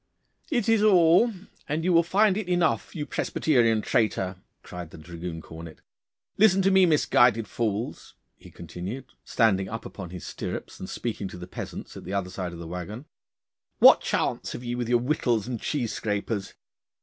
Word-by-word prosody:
'It 240 Hz, -8 st, 0 dB
is 225 Hz, -2 st, +4 dB
all, 185 Hz, +2 st, +5 dB, 0.4 s
and 155 Hz, +2 st, -1 dB
you 180 Hz, +1 st, +2 dB
will 170 Hz, -, +6 dB
find 195 Hz, +3 st, +3 dB
it 205 Hz, -3 st, -3 dB
enough, 175 Hz, 0 st, +1 dB
you 150 Hz, -3 st, -3 dB
Presbyterian 115 Hz, -11 st, +1 dB
traitor,' 95 Hz, -4 st, 0 dB, 0.3 s
cried 90 Hz, -2 st, -8 dB
the -, -, -12 dB
dragoon 85 Hz, +1 st, -7 dB
cornet. 80 Hz, -1 st, -10 dB, 0.6 s
'Listen 195 Hz, -2 st, +6 dB
to 195 Hz, -, +4 dB
me, 190 Hz, -1 st, +6 dB
misguided 120 Hz, -7 st, +3 dB
fools,' 110 Hz, +1 st, -3 dB, 0.2 s
he -, -, -15 dB
continued, 90 Hz, +9 st, -7 dB, 0.2 s
standing 95 Hz, -5 st, +2 dB
up 115 Hz, +1 st, -6 dB
upon 90 Hz, -4 st, -8 dB
his 90 Hz, 0 st, -8 dB
stirrups -, -, -6 dB
and -, -, -7 dB
speaking 110 Hz, -4 st, -4 dB
to 90 Hz, -, -9 dB
the 90 Hz, -, -7 dB
peasants 90 Hz, -, -8 dB
at -, -, -9 dB
the 100 Hz, -, -4 dB
other 95 Hz, -2 st, -2 dB
side 90 Hz, -2 st, -4 dB
of 85 Hz, -, -9 dB
the 85 Hz, -, -8 dB
waggon. 90 Hz, -, -6 dB, 0.7 s
'What -, -, +8 dB
chance -, -, -1 dB
have 120 Hz, -, -7 dB
ye 120 Hz, 0 st, -3 dB
with 120 Hz, -1 st, -3 dB
your 120 Hz, -, +5 dB
whittles 120 Hz, -4 st, 0 dB
and 120 Hz, -3 st, -4 dB
cheese 120 Hz, -8 st, -2 dB
scrapers? 105 Hz, -1 st, -3 dB
115 Hz, 175 wpm, -26 LUFS, -, 0.7 s, What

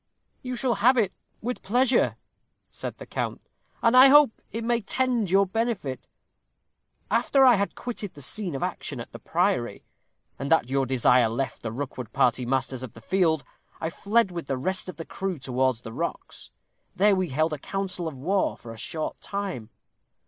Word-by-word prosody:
"You 255 Hz, -1 st, -4 dB
shall 245 Hz, 0 st, +1 dB
have 255 Hz, +4 st, +5 dB
it 205 Hz, -6 st, +2 dB, 0.3 s
with 245 Hz, +2 st, -3 dB
pleasure," 245 Hz, +4 st, +2 dB, 0.5 s
said -, -, -6 dB
the -, -, -9 dB
count; -, -, -3 dB, 0.4 s
"and 230 Hz, +1 st, +4 dB
I 260 Hz, +2 st, +10 dB
hope 290 Hz, -2 st, +7 dB, 0.2 s
it 230 Hz, +1 st, -3 dB
may 235 Hz, 0 st, +1 dB
tend 245 Hz, 0 st, 0 dB
to -, -, -6 dB
your 195 Hz, +1 st, +5 dB
benefit. 195 Hz, -, -2 dB, 1.0 s
After 270 Hz, -1 st, +4 dB
I 250 Hz, -, +8 dB
had 200 Hz, -2 st, 0 dB
quitted 220 Hz, -5 st, -5 dB
the 145 Hz, -, -9 dB
scene 185 Hz, +1 st, 0 dB
of 135 Hz, -, -3 dB
action -, -, -4 dB
at -, -, -8 dB
the -, -, -9 dB
priory, -, -, 0 dB, 0.5 s
and 140 Hz, +3 st, -4 dB
at 130 Hz, -6 st, +3 dB
your 135 Hz, -1 st, +1 dB
desire 125 Hz, -2 st, +4 dB
left 120 Hz, +1 st, -3 dB
the 115 Hz, -, -4 dB
Rookwood 125 Hz, -2 st, -5 dB
party 125 Hz, 0 st, +2 dB
masters 130 Hz, 0 st, -1 dB
of 130 Hz, -4 st, -7 dB
the -, -, -12 dB
field, 165 Hz, -1 st, +2 dB, 0.4 s
I 160 Hz, -, -2 dB
fled 205 Hz, +2 st, +1 dB
with 170 Hz, -5 st, -6 dB
the 135 Hz, -, -1 dB
rest 185 Hz, +7 st, -2 dB
of 185 Hz, -, -8 dB
the 165 Hz, -, -6 dB
crew 190 Hz, -3 st, -3 dB
towards 130 Hz, -2 st, 0 dB
the 115 Hz, -2 st, -8 dB
rocks. -, -, -5 dB, 0.5 s
There 200 Hz, +2 st, +4 dB
we 185 Hz, -2 st, -1 dB
held 155 Hz, +4 st, +1 dB
a 150 Hz, -, -4 dB
council 185 Hz, 0 st, -3 dB
of 150 Hz, -4 st, -6 dB
war 190 Hz, +9 st, 0 dB
for 115 Hz, -1 st, -10 dB
a -, -, -12 dB
short 155 Hz, +6 st, -4 dB
time. 195 Hz, -, -4 dB
180 Hz, 185 wpm, -26 LUFS, 130-225 Hz, 1.0 s, I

